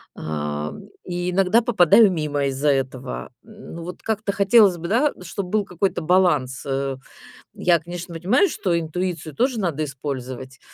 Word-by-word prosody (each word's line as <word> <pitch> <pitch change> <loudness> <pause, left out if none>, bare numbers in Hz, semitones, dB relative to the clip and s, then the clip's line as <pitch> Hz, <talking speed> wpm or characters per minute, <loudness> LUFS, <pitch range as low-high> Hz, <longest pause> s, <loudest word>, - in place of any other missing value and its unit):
а, 75 -1 -4 0.3
и 175 0 -2
иногда 195 +5 +3
попадаю 205 -2 +5
мимо 150 -4 -1
из-за 135 +2 0
этого. 130 -2 -2
Ну, 210 -6 -10
вот 180 +2 -8
как-то 215 -2 -1
хотелось 200 -1 +5
бы 170 +1 -6
да, 265 +7 +2
чтобы 180 +1 -5
был 210 0 +1
какой-то 180 0 -1
баланс, 155 -7 +2
э. 135 -1 -2 0.6
Я, 175 -2 +2
конечно, 175 0 -8
понимаю, 215 - +3
что 170 -4 0
интуицию 165 -2 -4
тоже 250 -1 +1
надо 160 -6 -1
использовать. 130 -2 -6
175 Hz, 145 wpm, -22 LUFS, 140-195 Hz, 0.6 s, попадаю